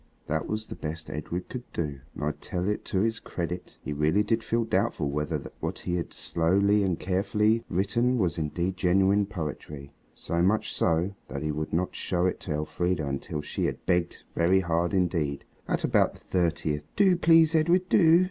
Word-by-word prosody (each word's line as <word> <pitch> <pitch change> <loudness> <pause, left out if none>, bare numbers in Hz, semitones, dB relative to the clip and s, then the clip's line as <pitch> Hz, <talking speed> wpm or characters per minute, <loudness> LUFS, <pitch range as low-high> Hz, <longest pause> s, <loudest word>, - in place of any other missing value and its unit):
That 80 +1 -1
was 110 +1 -3
the - - -7
best 80 +1 -6
Edred 85 +5 -4
could 125 -1 -8
do, 75 -5 -3 0.2
and - - -5
I 75 - +1
tell 90 +4 -4
it 105 - -1
to 95 - 0
his 115 +1 0
credit, 90 +1 -5
he 75 - -3
really 75 +8 +2
did 115 +2 0
feel 115 0 +1
doubtful 95 -8 0
whether 75 0 -2 0.2
what - - -3
he 90 - -3
had 85 - -4
so - - -6
slowly 100 +5 +3
and 95 -4 +1
carefully 105 +4 +1
written 120 +7 +1
was 90 -6 0
indeed 85 +4 -1
genuine 95 +3 +3
poetry. 75 -6 -6 0.2
So 85 0 -2
much 100 +5 +2
so, 85 +4 +1
that 70 +1 -5
he 75 - 0
would 75 +1 -3
not 90 +3 0
show 90 -1 0
it 95 - 0
to 90 - -6
Elfrida 80 +2 -1
until 70 +2 -3
she 75 - -3
had - - -3
begged 90 -1 0
very 90 +3 +3
hard 85 0 0
indeed. 85 -6 0 0.2
At - - -1
about - - +3
the - - -16
thirtieth 85 -4 0
"Do, 195 -3 +5
please! 165 -2 +5
Edred, 170 +3 +3
do!" 170 -2 +6
90 Hz, 190 wpm, -27 LUFS, 80-105 Hz, 0.2 s, do